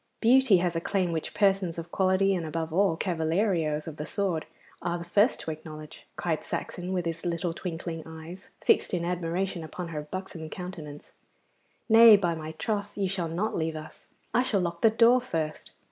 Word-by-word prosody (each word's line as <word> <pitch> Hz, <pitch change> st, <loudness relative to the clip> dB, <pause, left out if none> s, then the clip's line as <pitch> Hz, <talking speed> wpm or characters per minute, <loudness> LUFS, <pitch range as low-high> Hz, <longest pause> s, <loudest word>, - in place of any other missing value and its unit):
'Beauty 240 Hz, -3 st, +5 dB
has 175 Hz, -1 st, 0 dB
a 165 Hz, -, 0 dB
claim 185 Hz, -1 st, 0 dB
which 160 Hz, -1 st, -3 dB
persons 195 Hz, -4 st, +2 dB
of 165 Hz, 0 st, -7 dB
quality, 190 Hz, +1 st, +3 dB
and 180 Hz, -3 st, -1 dB
above 160 Hz, 0 st, -3 dB
all 185 Hz, -2 st, +3 dB
cavalieros 165 Hz, -2 st, 0 dB
of 155 Hz, -2 st, -7 dB
the 150 Hz, -, -4 dB
sword, 185 Hz, -6 st, -1 dB, 0.3 s
are 175 Hz, 0 st, -1 dB
the 170 Hz, -, -6 dB
first 205 Hz, +8 st, +3 dB
to 160 Hz, -, -4 dB
acknowledge,' 155 Hz, -1 st, -10 dB
cried 165 Hz, -3 st, -2 dB
Saxon, 180 Hz, +1 st, -4 dB
with 180 Hz, -2 st, -1 dB
his 165 Hz, 0 st, -3 dB
little 170 Hz, -1 st, -1 dB
twinkling 165 Hz, -1 st, -5 dB
eyes 160 Hz, +3 st, -10 dB
fixed -, -, +3 dB
in 170 Hz, -1 st, -2 dB
admiration 175 Hz, 0 st, -2 dB
upon 170 Hz, +2 st, -6 dB
her 155 Hz, -2 st, -4 dB
buxom 165 Hz, 0 st, -7 dB
countenance. 160 Hz, -6 st, -8 dB, 0.8 s
'Nay, 225 Hz, -1 st, +9 dB
by 175 Hz, -4 st, 0 dB
my 160 Hz, -1 st, -6 dB
troth, 205 Hz, +4 st, -3 dB
you 195 Hz, -1 st, +1 dB
shall 180 Hz, -3 st, -2 dB
not 185 Hz, +7 st, -1 dB
leave 160 Hz, -1 st, -1 dB
us. 155 Hz, 0 st, -10 dB, 0.3 s
I 245 Hz, -, +4 dB
shall 235 Hz, -7 st, +1 dB
lock 170 Hz, -1 st, -3 dB
the 225 Hz, -, +7 dB
door 235 Hz, +3 st, +5 dB
first. 160 Hz, -11 st, -3 dB
175 Hz, 185 wpm, -28 LUFS, 160-195 Hz, 0.8 s, Nay